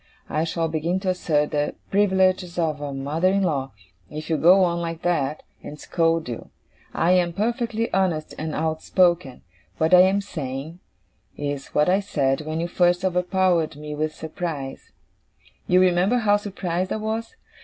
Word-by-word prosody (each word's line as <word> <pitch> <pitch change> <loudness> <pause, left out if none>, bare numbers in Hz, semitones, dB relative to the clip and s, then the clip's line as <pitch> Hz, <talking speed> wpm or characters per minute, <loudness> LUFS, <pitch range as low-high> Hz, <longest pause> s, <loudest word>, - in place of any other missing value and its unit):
I 155 +2 0
shall 165 0 -1
begin 165 +3 -1
to 190 - -1
assert 155 -5 0
the 145 0 -1 0.2
privileges 190 -3 +2
of 155 -3 -1
a 145 -1 -4
mother 145 +6 -1
in 195 +1 +2
law, 140 -6 -1 0.4
if 155 +2 -6
you 160 - +2
go 185 +4 +6
on 170 -1 0
like 165 -1 -5
that, 155 -4 0 0.2
and 150 - -9
scold 165 -2 0
you. 120 -2 -6 0.4
I 170 - +1
am 175 -2 +3
perfectly 230 +2 -1
honest 180 -5 0
and 155 0 -3
outspoken. 160 -1 +1 0.3
What 160 +3 +1
I 180 - +9
am 190 +2 +4
saying, 155 -3 -6 0.6
is 145 -1 -4
what 150 - +4
I 185 +2 +3
said 140 -8 0
when 155 +1 -2
you 170 - -1
first 175 +1 +2
overpowered 180 -3 +1
me 150 0 -7
with 155 +1 -2
surprise 155 -4 -6 0.8
you 180 - +4
remember 185 +5 +3
how 210 -4 +3
surprised 185 -3 -3
I - - 0
was? 220 +1 -4
170 Hz, 165 wpm, -23 LUFS, 155-185 Hz, 0.8 s, I